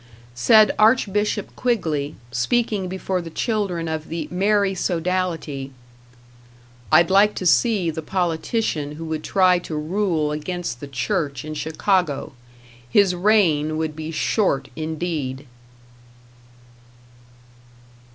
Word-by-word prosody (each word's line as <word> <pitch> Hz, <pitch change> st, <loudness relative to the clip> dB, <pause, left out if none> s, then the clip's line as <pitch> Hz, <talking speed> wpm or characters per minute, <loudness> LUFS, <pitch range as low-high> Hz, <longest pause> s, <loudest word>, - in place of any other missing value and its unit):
Said 210 Hz, -, +5 dB
Archbishop 210 Hz, -2 st, +2 dB
Quigley, 160 Hz, -, -1 dB, 0.2 s
speaking 195 Hz, -, 0 dB
before 185 Hz, 0 st, -2 dB
the 170 Hz, -, -8 dB
children 185 Hz, -3 st, -2 dB
of 160 Hz, -1 st, -4 dB
the 165 Hz, -1 st, -4 dB
Mary 200 Hz, +1 st, +2 dB
Sodality: 175 Hz, -6 st, -2 dB, 1.2 s
I'd 170 Hz, +4 st, +5 dB
like 205 Hz, +2 st, +5 dB
to 185 Hz, -, -4 dB
see 195 Hz, -2 st, +3 dB
the 160 Hz, +1 st, -5 dB
politician 165 Hz, -2 st, -1 dB
who 165 Hz, +2 st, -7 dB
would 160 Hz, -1 st, -4 dB
try 185 Hz, -2 st, +3 dB
to 165 Hz, -2 st, -6 dB
rule 160 Hz, -1 st, 0 dB
against 150 Hz, -4 st, -4 dB
the 145 Hz, -, -7 dB
church 140 Hz, +1 st, -2 dB
in 155 Hz, -, -5 dB
Chicago. 155 Hz, -1 st, 0 dB, 0.6 s
His 195 Hz, +6 st, +4 dB
reign 175 Hz, -6 st, +2 dB
would 160 Hz, -1 st, -2 dB
be 155 Hz, 0 st, -6 dB
short 155 Hz, -4 st, 0 dB
indeed. 155 Hz, -4 st, -4 dB
170 Hz, 110 wpm, -22 LUFS, 155-195 Hz, 1.2 s, Said